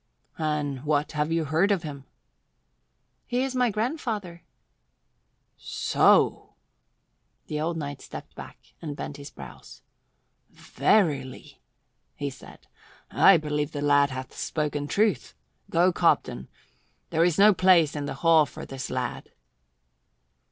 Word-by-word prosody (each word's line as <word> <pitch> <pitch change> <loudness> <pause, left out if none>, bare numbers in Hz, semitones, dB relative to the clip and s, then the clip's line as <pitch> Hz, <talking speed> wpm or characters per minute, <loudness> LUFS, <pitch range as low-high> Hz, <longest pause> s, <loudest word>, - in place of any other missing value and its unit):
"And 150 -4 -2
what 150 0 0
have 150 0 -1
you 165 -1 0
heard 160 +7 +2
of 195 -5 0
him?" 140 -3 -8 1.2
"He 250 +1 0
is 265 -1 -3
my 250 -1 +2
grandfather." 215 - -3 1.2
"So!" - - +2 0.9
The 150 0 -4
old 165 +1 -2
knight 145 -3 -6
stepped - - -10
back - - -10 0.2
and 150 -3 -5
bent 145 - -7
his 140 0 -9
brows. - - -13 0.7
"Verily," 140 -11 -1 0.5
he - - -4
said, - - -15 0.5
"I 195 - +6
believe 150 -1 -3
the 145 - -4
lad 145 -1 +4
hath 130 -1 -7
spoken 150 -2 -3
truth. 210 +5 0 0.3
Go, 175 +2 +3
Cobden. 65 - +1 0.6
There 165 0 +2
is 170 -3 +2
no 210 +1 +7
place 180 -5 +4
in 145 -1 -3
the 140 -1 -5
hall 160 -3 +6
for - - -9
this 135 -2 -7
lad." 125 -2 -4
155 Hz, 125 wpm, -26 LUFS, 145-180 Hz, 1.2 s, no